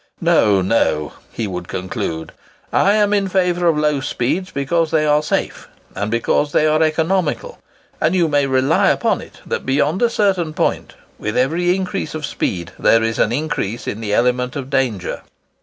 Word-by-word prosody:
No, 100 -3 +3
no," 85 -7 +1 0.2
he 115 - -3
would 90 -3 -5
conclude, 80 -3 -4 0.4
"I 200 - +4
am 210 -1 +2
in 200 -1 +1
favour 180 -2 +1
of 165 -2 +3
low 150 -1 +1
speeds 145 +6 -2
because 155 +4 0
they 155 -1 +2
are 150 0 +3
safe, 150 - -2 0.3
and 100 +2 -3
because 120 +5 0
they 155 - +3
are 155 +1 +2
economical; 160 +2 0 0.4
and 165 +4 +2
you 175 -3 +3
may 145 -2 +2
rely 130 0 +3
upon - - +1
it - - -14
that, - - -3
beyond 150 +6 0
a 240 - +4
certain 190 -8 0
point, - - -1 0.2
with 105 +1 -3
every 170 +8 +2
increase 185 -5 -3
of 155 -2 -3
speed 85 -10 -3
there 115 0 +4
is 115 0 -1
an 105 - +2
increase 120 -5 -2
in 110 - -4
the 105 -2 -3
element 125 +3 +1
of 135 -1 -5
danger." 125 -9 -1
145 Hz, 175 wpm, -19 LUFS, 115-170 Hz, 0.4 s, I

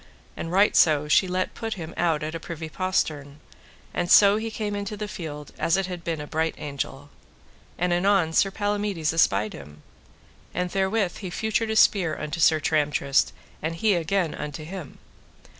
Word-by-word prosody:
And 165 - -5
right 200 +3 +4
so 150 -2 +4
she 170 +5 +4
let 185 +1 -1
put 225 -1 -4
him 170 -3 -7
out 165 -3 +1
at 155 +1 -4
a 165 - -4
privy 165 -1 -7
postern, 150 -5 -2 0.5
and 175 - -1
so 200 +1 +7
he 225 +1 -3
came 210 -2 -3
into 205 +1 -4
the 210 0 -4
field 150 -7 -7
as 165 +3 +2
it 195 - 0
had 180 -2 -6
been 165 -2 -2
a 150 - -5
bright 160 +2 -1
angel. 140 0 -5 0.7
And 175 0 +1
anon 175 -2 +2
Sir 195 - +4
Palamides 205 -5 -1
espied 105 -10 +2
him, 75 +1 -12 0.7
and 180 0 -1
therewith 195 -1 0
he 190 - -6
feutred 220 +4 -1
a 220 - -1
spear 185 -7 +4
unto 155 +2 -4
Sir 160 -1 +5
Tramtrist, 145 -2 +1 0.3
and 160 +2 -2
he 210 +5 +2
again 175 0 0
unto 150 +1 -6
him. 175 -2 -8
170 Hz, 175 wpm, -25 LUFS, 155-195 Hz, 0.7 s, so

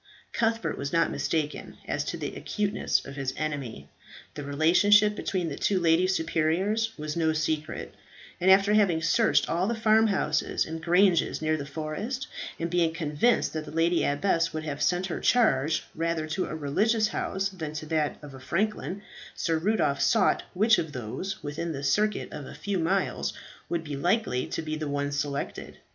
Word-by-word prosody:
Cuthbert 225 0 0
was 140 0 -3
not 165 0 +2
mistaken 155 -2 -2
as - - -1
to - - -3
the - - -5
acuteness 210 -1 -1
of 140 - -8
his 135 -2 -3
enemy. 140 - -4 0.5
The 145 - -6
relationship 190 +9 +4
between 185 -4 -2
the 140 - -4
two 195 +4 +1
lady 170 +1 +3
superiors 190 +6 0
was 150 0 -4
no 160 -2 +2
secret, 155 -1 -2 0.5
and 185 +1 +3
after 195 +2 +6
having 185 -6 +3
searched 220 +7 +3
all 175 +3 0
the 235 - 0
farmhouses 215 -8 +2
and 160 0 -6
granges 175 +1 +3
near 155 0 +1
the 140 -2 -5
forest, 160 - -4 0.3
and 165 - -1
being 170 -1 +1
convinced 160 +8 +1
that 155 -1 -3
the - - -9
lady 165 +2 +2
abbess 165 +3 +1
would 155 0 -4
have 145 -2 -5
sent 180 +1 +1
her 180 - -4
charge 155 - +2
rather 165 -1 -1
to 185 +4 -1
a - - -5
religious 215 +10 +1
house 195 0 -2
than 160 -6 -6
to 155 0 -5
that 155 -1 0
of 145 -2 -10
a 130 - -10
franklin, 195 +6 -2 0.3
Sir 165 -2 0
Rudolph 165 -7 +1
sought - - +3
which 215 +4 +4
of 160 -3 -4
those 130 - -5
within 155 +3 -3
the 140 -1 -6
circuit 210 +10 0
of 145 -3 -7
a - - -10
few 200 -2 -2
miles 190 +4 0 0.4
would 170 -1 -1
be 150 -2 -5
likely 175 - 0
to - - -4
be 155 0 -3
the 155 -1 -4
one 145 0 -1
selected. 140 0 -4
165 Hz, 180 wpm, -27 LUFS, 150-195 Hz, 0.5 s, after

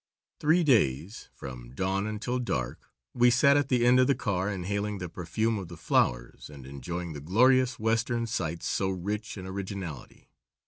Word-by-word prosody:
Three 160 +4 +3
days, 95 - +1
from 60 -2 -9
dawn 95 +5 -1
until 115 +4 -2
dark, 65 - -3 0.2
we 120 0 +5
sat 135 +3 +5
at 145 -2 +1
the 125 -2 +3
end 125 +1 +6
of 130 - +5
the 140 - +3
car 95 -3 -1
inhaling 100 +2 -2
the 90 -1 -5
perfume 105 +6 -1
of 95 - -7
the 85 0 -10
flowers - - 0
and 70 -3 -11
enjoying 80 +6 -5
the 75 - -7
glorious 125 - +3
Western 115 +2 0
sights 85 -7 -3
so 95 - 0
rich 100 +4 -4
in 95 - -7
originality. 95 -4 -7
100 Hz, 170 wpm, -28 LUFS, 85-120 Hz, 0.2 s, end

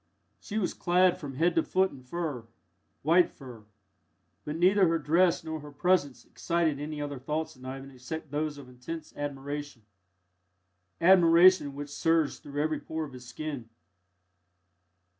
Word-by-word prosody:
She 215 - -5
was 200 -5 0
clad 180 +1 +3
from 140 -3 -7
head 165 +5 +2
to 165 - +3
foot 190 +3 +1
in 135 - -12
fur 130 -3 -4 0.6
white 170 +4 +5
fur 120 -6 -12 0.8
but 150 - -4
neither 185 +3 +4
her 165 0 +2
dress 165 +3 +2
nor 160 -1 -4
her 150 0 -11
presence 145 -5 +1
excited 165 -4 -1
any 150 +1 -5
other 145 -2 -4
thoughts 155 +4 -3
in 130 0 -14
Ivan 135 +1 -7
except 135 +4 -7
those 150 0 -2
of 140 -3 -11
intense 125 +6 -8
admiration 145 -3 -5 1.2
admiration 170 -3 +6
which 145 0 -6
surged 165 0 +1
through 145 +1 -3
every 155 0 -1
pore 160 0 -4
of 140 - -12
his 125 -1 -11
skin. 140 -4 -6
150 Hz, 150 wpm, -29 LUFS, 140-165 Hz, 1.2 s, admiration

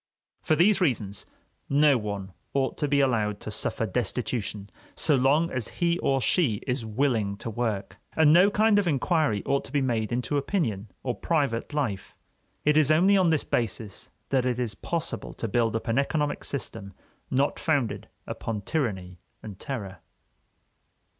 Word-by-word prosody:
For 155 - +2
these 190 +6 +4
reasons, 110 - 0 0.4
no 145 0 +5
one 100 -4 -4 0.2
ought 135 -1 +1
to 150 - +1
be 140 0 +3
allowed 110 -6 +1
to 110 - -6
suffer 115 - -2
destitution 110 -1 -3 0.3
so 150 - +2
long 140 +6 +3
as 125 -4 -2
he 170 -1 +1
or 135 -1 +1
she 130 - +2
is 125 -2 -1
willing 110 -3 0
to 115 - -5
work. 105 -4 -3 0.2
And 155 -1 +6
no 180 +4 +7
kind 210 0 +4
of 200 - 0
inquiry 150 - +1
ought 140 0 +1
to - - -10
be 145 - +2
made 120 -5 -1
into 125 +4 -1
opinion 125 - -1 0.2
or 125 - -1
private 140 -6 -1
life. 135 -10 -3 0.5
It 150 0 +4
is 155 -2 +4
only 180 +6 +5
on 185 -3 +4
this 160 -3 +2
basis 110 -4 -2 0.2
that 130 -2 +2
it 125 -1 0
is 120 -4 -2
possible 165 - -4
to 115 - -4
build 115 +1 +1
up 115 - -3
an 115 +3 +2
economic 145 +1 -1
system 100 -7 -4 0.4
not 135 +2 +1
founded 140 -8 0 0.2
upon 110 -2 -4
tyranny 95 - -3 0.2
and 105 -4 -9
terror. 100 - -5
130 Hz, 165 wpm, -27 LUFS, 110-150 Hz, 0.5 s, no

